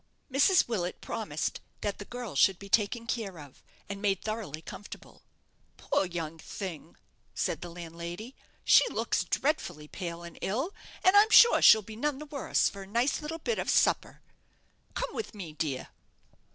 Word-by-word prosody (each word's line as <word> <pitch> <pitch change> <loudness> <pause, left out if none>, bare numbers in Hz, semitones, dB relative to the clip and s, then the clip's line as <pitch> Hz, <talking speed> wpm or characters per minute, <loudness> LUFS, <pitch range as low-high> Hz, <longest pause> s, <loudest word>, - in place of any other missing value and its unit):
Mrs. 285 +8 +4
Willet 185 -6 -2
promised 160 -9 -3 0.2
that 205 -1 -2
the 205 - -7
girl 245 -7 -7
should 190 +6 +4
be 200 +1 -11
taken 230 +3 +1
care 225 -7 -3
of, 145 -4 -13 0.3
and 200 0 -6
made 195 -3 0
thoroughly 210 -9 -4
comfortable. 205 - -10 0.6
"Poor 190 - 0
young 165 -2 -5
thing," 180 -2 -7 0.4
said - - -1
the 175 - -6
landlady, 170 +6 -7 0.3
"she - - +7
looks - - 0
dreadfully 175 - -1
pale 170 0 -6
and 170 -1 -10
ill, 265 - -1 0.3
and 370 +2 +5
I'm 415 +2 +7
sure 470 +1 +8
she'll 220 - +8
be 215 +2 -9
none 290 +4 -1
the 300 - -8
worse 285 -3 +1
for 200 - -6
a 195 - -9
nice 235 +9 +1
little 305 +2 -4
bit 455 +8 -2
of - - -2
supper. - - +2 0.7
Come - - -3
with 440 - -5
me, 190 -5 -6
my 155 - -15
dear." 140 -5 -2
200 Hz, 170 wpm, -29 LUFS, 170-250 Hz, 0.7 s, sure